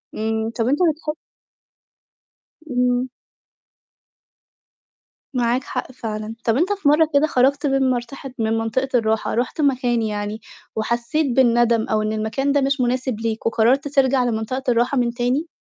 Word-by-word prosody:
إمم 220 +1 -1
طَب 230 0 -2
أنت 285 +3 +1
بتح 305 0 -5 1.6
إمم. 250 0 +1 2.2
معاك 245 0 +1
حق - - -5
فعلًا، 220 -2 -5
طَب 225 -1 +2
أنت 365 +7 +2
في 390 -7 -2
مَرّة 305 +2 +4
كده 290 +2 +4
خرجت 275 +2 +2
من 270 -1 +2
منطقة 250 +2 -4
من 220 0 +1
منطقة 225 +4 -1
الراحة 220 0 -1
رُحت 245 +6 -1
مكان 250 -4 +1
يعني، 210 0 -3 0.3
وحسّيت 235 +7 0
بالندم 235 -3 +3
أو 215 0 +1
إن 215 0 -1
المكان 220 +6 -1
ده 285 0 +2
مش 275 0 +1
مناسب 250 -2 -1
ليك 225 -1 -3
وقررت 235 +5 +2
ترجع 270 -2 +2
لمنطقة 240 +2 -2
الراحة 240 +3 +1
من 235 -1 +1
تاني؟ 255 +7 -1
245 Hz, 140 wpm, -21 LUFS, 225-270 Hz, 2.2 s, مَرّة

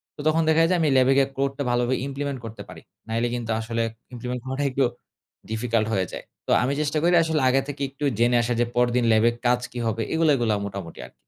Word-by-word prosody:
তো - - -25
তখন 160 +1 +3
দেখা 160 +1 +4
যায় 180 - +3
আমি 155 - +3
ল্যাবে 130 +1 +4
গিয়ে 135 -1 +4
কোডটা 140 +1 -1
ভালোভাবে 120 +1 +1
ইমপ্লিমেন্ট 140 -1 -4
করতে 110 0 -8
পারি। - - -11 0.3
নাইলে 115 +2 0
কিন্তু 115 -2 -4
আসলে 115 +1 -2 0.3
ইমপ্লিমেন্ট 125 +1 -4
করাটা 130 +2 -3
একটু 135 +1 +1 0.7
ডিফিকাল্ট 110 -1 0
হয়ে 95 -2 +1
যায়। - - -7 0.2
তো - - 0
আমি 135 +3 0
চেষ্টা 150 +1 -1
করি 175 +1 +3
আসলে 160 -3 0
আগে 135 +1 +3
থেকে 145 0 -6
একটু 140 +2 -9 0.2
জেনে 120 +1 +3
আসার, 120 0 -1
যে - - +3
পরদিন 120 0 +2
ল্যাবের 115 +2 +3
কাজ 125 0 +3
কী 120 - -6
হবে? 115 +1 -1
এগুলো, 160 -1 +2
এগুলো 115 -4 +1
মোটামুটি 95 -4 -8
আরকি। - - -15
125 Hz, 220 wpm, -24 LUFS, 115-140 Hz, 0.7 s, দেখা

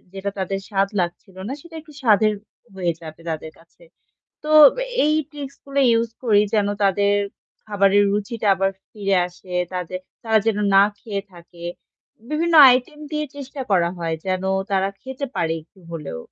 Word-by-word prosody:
যেটা 195 +1 -3
তাদের 195 +1 -2
স্বাদ 195 -1 +1
লাগছিল 180 +2 -5
না, - - -3
সেটা 335 +2 -15
একটু 305 0 -17
স্বাদের 215 -2 +4 0.4
হয়ে 180 -3 -1
যাবে 160 0 -10
তাদের 160 0 -5
কাছে। 165 - -24 0.6
তো 305 - -3 0.5
এই 305 +1 +3 0.2
ট্রিক্স 280 -2 -8
গুলো 280 0 -1
ইউজ 230 0 +2
করি, 210 -3 +5
যেন 210 -2 +3 0.2
তাদের 200 +1 +3 0.5
খাবারের 205 -1 +3
রুচিটা 210 +2 -2
আবার 195 +1 +1 0.2
ফিরে 195 -2 0
আসে, 180 +1 -14 0.2
তাদের 180 0 -4 0.2
তারা 220 -1 +3
যেন 220 -2 +1 0.2
না 195 - +8 0.2
খেয়ে 200 -3 -4
থাকে। 170 0 -14 0.7
বিভিন্ন 330 +2 0 0.2
আইটেম 255 +5 0
দিয়ে 300 0 -1
চেষ্টা 275 0 -8
করা 175 -3 +3
হয়। 165 -1 -2
যেন 185 0 -1 0.3
তারা 195 0 +1
খেতে 265 +1 -5
পারে 165 -1 0
একটু 175 +4 -24
হলেও। 150 - -6
200 Hz, 160 wpm, -22 LUFS, 185-245 Hz, 0.7 s, না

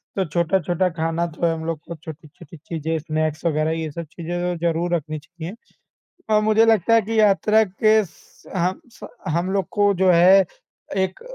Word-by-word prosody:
तो 190 - 0
छोटा-छोटा 175 +2 0
खाना 165 0 -1
तो 170 +1 -3
हम 160 -1 -2
लोग 165 -2 -3
को, 170 +2 -9
छोटी-छोटी 155 +1 -12
चीज़ें, 160 +1 -4
स्नैक्स 155 +1 -2
वगैरह, 155 0 +1
ये 160 -1 -3
सब 170 +2 -6
चीज़ें 175 +1 -5
तो 180 0 -1
ज़रूर 170 +1 0
रखनी 155 -1 -4
चाहिए। 175 +5 -9 0.8
अ, 215 - +4
मुझे 215 +1 +4
लगता 225 0 +3
है 225 - +5
कि 225 +2 -2
यात्रा 215 +1 +4
के 215 +2 +2
स 170 - -20
हम 180 +2 0
स - - -11 0.2
हम 170 +4 -1
लोग 195 -3 0
को, 205 -1 +3
जो 185 0 +3
है, 185 +3 +6 0.5
एक 190 -1 -1
170 Hz, 180 wpm, -22 LUFS, 160-190 Hz, 0.8 s, है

